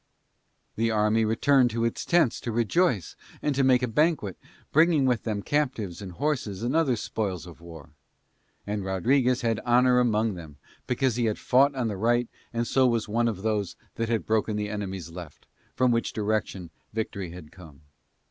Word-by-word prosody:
The 115 +1 +1
army 110 +1 +2
returned 125 +4 +3
to 115 0 -1
its 115 - -2
tents 170 -8 +2
to 120 - -3
rejoice 120 - +1 0.2
and 150 - 0
to 135 0 +1
make 130 -1 +4
a - - +1
banquet, 140 - +1 0.4
bringing 155 -2 +4
with 125 -4 0
them 105 -3 -2
captives 125 - -1
and 95 -3 -7
horses 115 - -2
and 125 +5 -1
other 155 -7 +3
spoils 100 -6 -3
of 85 -2 -13
war. 80 -4 -12 0.7
And 105 -1 -3
Rodriguez 125 +7 +1
had 115 -3 0
honour 125 +1 +3
among 110 -3 +1
them 80 -5 -10 0.3
because 125 -1 0
he 120 - +1
had 110 -2 0
fought 135 +2 +3
on 125 -3 -1
the 105 -3 -3
right 120 +3 +1 0.2
and 120 0 -1
so 130 +2 +3
was 115 -2 0
one 115 +3 +1
of 105 -4 -3
those 105 -4 -1 0.2
that 115 0 -3
had 115 -2 0
broken 110 -1 0
the 105 0 -2
enemy's 95 -5 -5
left, 85 -4 -10 0.3
from 130 -1 +3
which 115 0 0
direction 105 -5 -2 0.2
victory 100 -4 -4
had 85 -3 -11
come. 80 -5 -15
115 Hz, 180 wpm, -26 LUFS, 100-125 Hz, 0.7 s, make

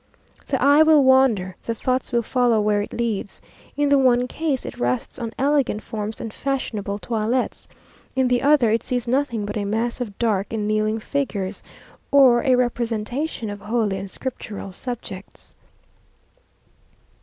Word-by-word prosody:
The 265 - 0
eye 285 +3 +6
will 315 -2 +6
wander 255 -9 +3
the 230 - -3
thoughts 255 +3 -1
will 235 -1 +1
follow 245 -1 +2
where 210 -1 +2
it 205 - -6
leads. 225 -4 -3 0.4
In 290 0 +2
the 280 -1 +5
one 250 -1 +3
case 290 -1 -2
it - - -7
rests 120 0 -2
on 230 -2 -4
elegant 275 -6 +1
forms 215 0 -5
and 225 - -6
fashionable 220 -7 -3
toilets 225 +4 -2 0.5
in 260 -1 +2
the 245 -1 +2
other, 275 -5 +4
it 225 - +2
sees 245 -2 -2
nothing 240 -4 0
but 205 - -4
a 205 - -1
mass 225 +4 -2
of 205 -5 -5
dark 210 -4 0
and 210 -2 -1
kneeling 215 +1 +1
figures, 210 -7 -3 0.5
or 260 -4 +6
a 260 -2 +4
representation 240 +2 -2
of 205 0 -8
holy 210 -2 0
and 195 0 -7
scriptural 210 -5 -6
subjects. 200 -3 -8
235 Hz, 155 wpm, -22 LUFS, 210-260 Hz, 0.5 s, eye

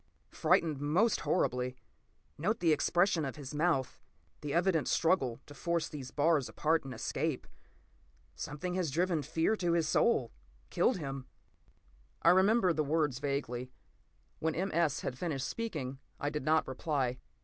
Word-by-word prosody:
Frightened 160 -3 +2
most 175 +11 +2
horribly. 125 -7 0 0.6
Note 200 +9 -1
the 165 -3 +4
expression 175 +2 +2
of 135 - -3
his 145 -2 -8
mouth, 150 -4 0 0.4
the 150 - -4
evident 170 -1 +2
struggle 160 -9 +2
to 145 - -12
force 170 +3 -1
these 135 -4 -7
bars 150 -2 +2
apart 160 +1 +1
and 135 - -7
escape. 135 +4 -2 0.9
Something 150 +5 -5
has 180 -3 0
driven 170 +2 +1
fear 160 +8 +1
to 175 -3 +1
his 165 -2 +2
soul, 140 - +2 0.4
killed - - +2
him." 135 -5 -5 1.0
I - - +7
remember 190 0 +4
the 155 - 0
words 145 -3 0
vaguely. 130 -3 -3 0.7
When 160 0 -1
M. 190 +3 -1
S. 155 -3 +1
had 125 - -4
finished 140 -7 -2
speaking, 150 - -4 0.2
I 145 - -1
did 150 - -3
not 160 +1 +3
reply. 130 -2 -1
155 Hz, 150 wpm, -32 LUFS, 135-170 Hz, 1.0 s, I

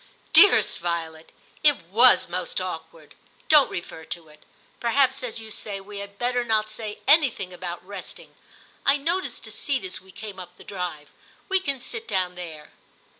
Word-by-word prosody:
* - - -34
Dearest 410 - +6
Violet, 165 -2 -4 0.3
it 295 -1 +6 0.2
was 245 +4 +6
most 175 0 -3
awkward; 185 - -7 0.4
don't 300 -3 +7
refer 165 -2 -6
to 160 0 -6
it. 150 0 -18 0.4
Perhaps, 265 +3 +2
as 245 -3 -4
you 220 -1 -9
say, 205 -1 -4
we 200 +1 -9
had 200 0 -9
better 245 +2 +1
not 215 -2 +1
say 215 -1 -5
anything 265 - +4
about 175 -1 -6
resting. 195 -1 -9 0.5
I 275 +1 +4
noticed 340 +6 -2
a - - -9
seat 265 -8 -2
as 185 - -6
we 190 0 -17
came 205 -2 -8
up 180 0 -10
the - - -13
drive; 175 -6 -5 0.4
we 380 0 +3
can 280 -7 -2
sit 445 - -6
down 180 -1 0
there.' 165 -4 -9
200 Hz, 175 wpm, -25 LUFS, 180-255 Hz, 0.5 s, don't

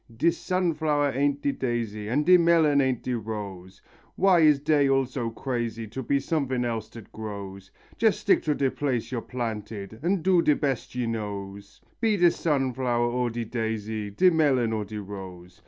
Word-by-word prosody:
De 170 +8 +3
sunflower 160 -6 0
ain't 140 +1 0
de 140 - +2
daisy, 115 -5 -3
and 145 +7 0
de 180 - +7
melon 165 -4 +4
ain't 130 -3 0
de 125 - -2
rose; 100 -5 -6 0.3
Why 185 -2 +4
is 150 -3 +5
dey 145 -1 +2
all 135 0 +3
so 125 -2 -4
crazy 115 -1 -3
to 130 +5 -5
be 140 +3 +1
sumfin 135 -4 -1
else 115 -2 -3
dat 115 -3 -12
grows? 100 -3 -7 0.3
Jess 220 -2 +3
stick 205 - +2
to 150 -2 +1
de 135 -2 +1
place 130 -5 -2
yo're 120 -3 -2
planted, 110 -3 -5
and 175 +1 0
do 185 -2 +4
de 150 -3 +3
bes 135 -5 -2
yo 125 -1 -1
knows; 100 -3 -6 0.2
Be 220 -3 +2
de 175 -2 +5
sunflower 130 -6 0
or 125 0 0
de 115 0 -4
daisy, 110 -2 -3
de 180 - +4
melon 135 -8 +2
or 105 -1 -2
de 105 +2 -7
rose. 95 -3 -9
125 Hz, 180 wpm, -26 LUFS, 110-145 Hz, 0.3 s, de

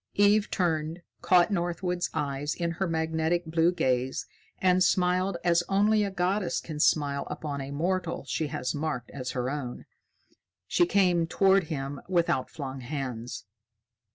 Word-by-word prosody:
Eve 205 +1 +4
turned, 165 -1 -1 0.2
caught 180 +2 +4
Northwood's 175 -1 -1
eyes 145 -1 -2
in 170 -1 -1
her 185 +3 -2
magnetic 160 +1 0
blue 165 +2 +2
gaze, 130 -6 0 0.3
and 185 0 +3
smiled 180 0 +2
as 170 0 +4
only 210 +2 +3
a 200 - -1
goddess 185 -1 0
can 155 -2 -7
smile 140 -2 +2
upon 145 -3 -4
a 135 - -6
mortal 175 +4 -2
she 155 - -1
has 145 -4 -3
marked 145 -5 -3
as 130 -2 -5
her 125 0 -1
own. 135 -4 -5 0.8
She 350 - +2
came 180 - +3
toward 195 +1 +3
him 140 -3 -4
with 175 -2 +2
outflung 135 0 -3
hands. 125 -4 -5
165 Hz, 145 wpm, -28 LUFS, 145-180 Hz, 0.8 s, Eve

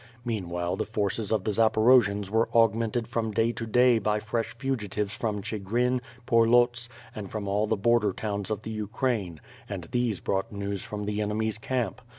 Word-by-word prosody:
Meanwhile 90 -5 -2
the 110 - -1
forces 105 -1 -1
of 110 -4 +1
the 105 - 0
Zaporojians 110 -2 +4
were 110 +1 +2
augmented 115 0 +2
from 115 -2 -1
day 115 +2 +1
to 115 -1 -5
day 125 +1 +4
by 105 0 0
fresh 110 +2 -2
fugitives 105 -6 -3
from 105 -3 -2
('higrin, 115 +5 0 0.2
Porlots, 120 +1 +3 0.2
and 100 -3 -7
from 105 -2 -4
all 105 +2 +1
the 110 - +1
border 115 0 +3
towns 100 0 -3
of 110 -3 -3
the 110 - -5
Ukraine, 110 - -2 0.3
and 100 -4 -4
these 120 -5 0
brought 95 0 -2
news 100 -1 -3
from 105 -1 -5
the 105 +1 -2
enemy's 110 +1 -1
camp. 125 -1 -2
110 Hz, 170 wpm, -27 LUFS, 100-115 Hz, 0.3 s, Zaporojians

